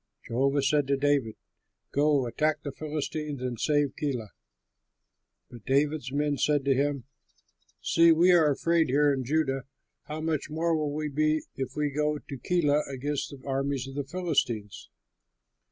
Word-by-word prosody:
Jehovah 135 +4 +1
said 145 0 +2
to 140 0 +2
David, 140 -5 +1 0.6
"Go, 145 -2 +2
attack 150 +6 0
the 140 - -4
Philistines 150 0 -4
and 125 -3 -3
save 145 -2 +1
Keilah." 125 -8 -3 1.2
But 120 -3 -12
David's 140 -1 +1
men 145 -1 0
said 145 +1 +2
to 140 - +4
him, 140 -1 0 0.8
"See, 165 0 +5
we 170 +3 +5
are 165 -4 +5
afraid 165 +2 +2
here 145 +2 +3
in 135 -1 -2
Judah; 135 -1 0 0.4
how 150 +1 -5
much 155 -2 -2
more 165 +2 0
will 150 -2 -1
we 155 0 -2
be 155 +2 +1
if 130 -2 -4
we 150 -1 0
go 150 +1 0
to 140 -1 -8
Keilah 150 -1 +2
against 140 +2 -3
the 140 -1 -12
armies 135 -1 -1
of 135 - -8
the 145 +1 -2
Philistines?" 135 - -2
145 Hz, 155 wpm, -28 LUFS, 135-155 Hz, 1.2 s, See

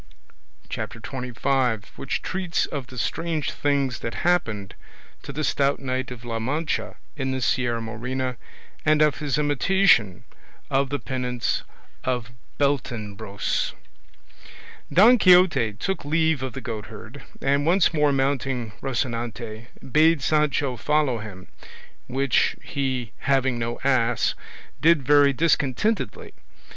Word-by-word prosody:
CHAPTER - - -5
XXV. 125 -2 -1
WHICH 135 - -3
TREATS 185 -3 -1
OF 140 -4 -5
THE 130 - -11
STRANGE 160 +5 -1
THINGS 140 -3 0
THAT 115 - -5
HAPPENED 110 - +1 0.5
TO 140 - -7
THE 150 +3 -3
STOUT 140 0 +1
KNIGHT 130 -1 -2
OF 125 -1 -9
LA 115 -1 -3
MANCHA 150 +7 -2 0.2
IN 135 -2 -2
THE 130 0 -1
SIERRA 120 -2 0
MORENA, 125 +3 -3 0.5
AND 155 -1 +4
OF 150 -1 +2
HIS 145 -2 -1
IMITATION 145 - +3 0.5
OF 135 0 +2
THE 145 - -1
PENANCE 125 -4 -2 0.4
OF 125 -3 -2 0.3
BELTENEBROS 110 -7 -1 1.2
Don 225 +7 +7
Quixote 180 - +5
took 190 - -3
leave 160 -1 +1
of 130 -1 -4
the 135 - -6
goatherd, 110 -3 -7 0.2
and 140 +2 +1
once 175 0 +4
more 150 -2 +3
mounting 135 -4 -1
Rocinante 120 -3 -3 0.2
bade 155 0 +4
Sancho 145 -4 +1
follow 150 -5 +1
him, 95 -4 -9 0.6
which 135 0 +1
he 130 -5 -2
having 130 -3 +1
no 115 0 -3
ass, 125 -3 +2 0.5
did 160 -2 +5
very 145 +1 +5
discontentedly. 155 - 0
135 Hz, 120 wpm, -24 LUFS, 120-150 Hz, 1.2 s, Don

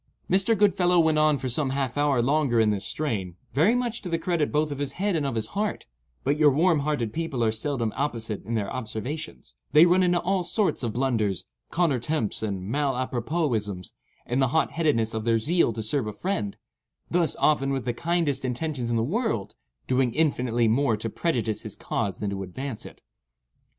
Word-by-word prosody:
Mr. 195 +4 +3
Goodfellow 180 -3 +4
went 160 -2 +3
on 155 -1 +4
for 130 0 -4
some 135 +3 0
half 135 -2 -2
hour 145 -4 +2
longer 140 -3 +2
in 110 -1 +4
this 100 -2 -2
strain, 100 - -2 0.2
very 165 - +4
much 245 -2 -2
to 185 - -6
the 165 - +1
credit 165 -3 0
both 150 0 +1
of 140 - -5
his 140 -1 -2
head 200 +2 0
and 150 -3 0
of 125 - -3
his 110 - 0
heart; 210 +1 -2 0.4
but 145 +3 +1
your 150 -1 +7
warm 160 +3 +3
hearted 140 -7 -1
people 165 -7 -2
are 110 - +3
seldom 115 0 -1
apposite 115 -7 -3
in 115 +3 -3
their 105 -3 -2
observations—they 140 +6 0
run 180 +2 +4
into 175 -1 +3
all 185 +2 0
sorts 190 +4 0
of 115 -4 -2
blunders, 115 -7 0 0.2
contre 165 -7 +1
temps 120 -3 -1
and 100 -4 -3
mal 135 +5 0
apropos 130 +4 -1
isms, 100 -4 -3 0.3
in 125 +2 -1
the 135 - +4
hot 160 +6 +1
headedness 140 -9 +1
of 110 -1 -2
their 115 0 +3
zeal 160 +4 +2
to 110 0 -4
serve 115 +2 0
a 105 - -4
friend—thus, 170 - -3
often 140 -2 +2
with 135 -2 -2
the 120 - 0
kindest 165 -1 0
intentions 130 -1 -2
in 120 - 0
the 115 - +1
world, 185 - -1 0.3
doing 130 -2 +1
infinitely 125 -7 +2
more 115 0 +2
to 115 +1 -4
prejudice 115 -10 -1
his - - -6
cause 100 - -2
than 105 -1 -3
to 100 0 -4
advance 110 +6 -6
it. - - -16
135 Hz, 195 wpm, -26 LUFS, 115-160 Hz, 0.4 s, your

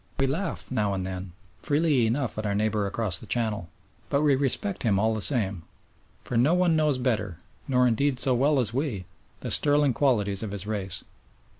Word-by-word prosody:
We 135 - +3
laugh, 165 +5 -3
now 105 -5 0
and 95 -1 -3
then, 95 -1 -6 0.3
freely 145 -6 +2
enough 125 +2 -1
at 110 - -4
our 100 - -1
neighbour 105 -1 0
across 100 -3 -1
the - - -11
Channel, 105 -7 -1 0.4
but 140 0 +1
we 145 -2 +4
respect 140 - -1
him 105 -5 +1
all 110 +3 +1
the 110 - -3
same, 100 - +2 0.6
for 125 - -5
no 135 +9 +3
one 180 -2 +2
knows 150 -3 +2
better 105 -8 -2 0.3
nor, 125 -2 +3
indeed, 130 +3 +1
so 130 0 +1
well 140 +3 +2
as 115 -3 +1
we 125 - -2 0.4
the - - -4
sterling 145 -2 +4
qualities 105 -8 +1
of 105 -3 -5
his 100 -1 -5
race. 100 -4 -3
120 Hz, 190 wpm, -26 LUFS, 100-140 Hz, 0.6 s, we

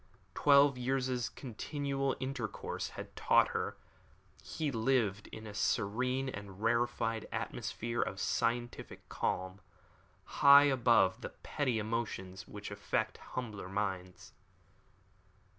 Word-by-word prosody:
Twelve 140 -2 +5
years' 125 -1 0
continual 135 +2 -3
intercourse 130 -4 -4
had - - -8
taught - - +4
her - - -3 0.6
that - - -21
he 155 -3 -2
lived 110 -4 +1
in 110 - -9
a 105 - -7
serene 125 +6 0
and 100 -6 -7
rarefied 115 -1 +1
atmosphere 120 +1 -3
of 95 - -2
scientific 120 +4 -2
calm, 95 +2 -2 0.8
high 140 0 +10
above 120 -8 +4
the - - -5
petty 130 -6 -2
emotions 105 -4 -3
which 105 0 -8
affect 100 0 -2 0.2
humbler 105 -7 -4
minds. 95 -2 -4
115 Hz, 110 wpm, -33 LUFS, 105-130 Hz, 0.8 s, high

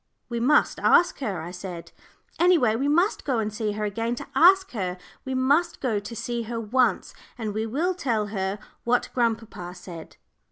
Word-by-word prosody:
"We 235 -1 -2
must 285 +6 +3
ask 350 - +4
her," 205 - -3
I 170 - -7
said; 180 -2 -8 0.5
"any 355 +1 +6
way, 225 -7 +2
we 270 +5 0
must 345 +8 +2
go 265 -4 0
and 215 -1 -1
see 215 -1 -2
her 210 +1 -4
again 230 +3 -2
to - - -7
ask 380 +3 +5
her. 185 -5 -3 0.3
We 265 0 -3
must 285 +7 +2
go 230 -6 0
to 205 +3 -8
see 235 +1 -3
her 230 +1 -4
once, 230 -1 +1 0.2
and 220 -3 -3
we 220 +2 -2
will 320 +11 0
tell 240 -12 -1
her 190 0 -1 0.3
what 240 +1 +1
grandpapa 225 -7 -2
said." 175 -3 -10
230 Hz, 190 wpm, -25 LUFS, 205-265 Hz, 0.5 s, any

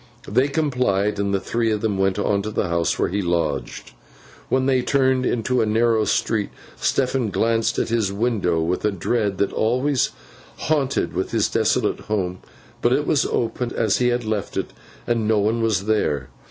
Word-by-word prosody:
They 125 +7 +2
complied, 125 -10 0
and 100 -1 0
the 100 - +1
three 115 +2 -1
went 95 -3 0
on 100 -1 +1
to 105 - -4
the 105 -4 -1
house 85 0 0
where - - +1
he 100 +3 -1
lodged. 85 -6 -2 0.6
When 130 0 +2
they 130 -1 +3
turned 130 -1 +2
into 125 +2 0
a 110 - +1
narrow 110 0 +2
street, 105 -2 0 0.3
Stephen 130 -3 0
glanced 115 +3 +1
at - - 0
his 110 -4 +1
window 100 -6 0
with 85 +3 -1
a 105 - +3
dread 100 +1 -1
that 100 - 0
always 125 +4 +1 0.5
haunted 145 -4 0 0.2
his - - +1
desolate - - +1
home; 95 -4 -2 0.4
but - - +3
it - - +1
was - - +2
open, 120 +1 -2
as 110 -4 +2
he 125 - +2
had 120 -1 0
left 110 -2 -3
it, - - -3 0.3
and 115 -2 0
no 110 -1 +3
one 110 +3 +1
was 105 -4 +1
there. 75 -11 0
110 Hz, 175 wpm, -22 LUFS, 100-120 Hz, 0.6 s, they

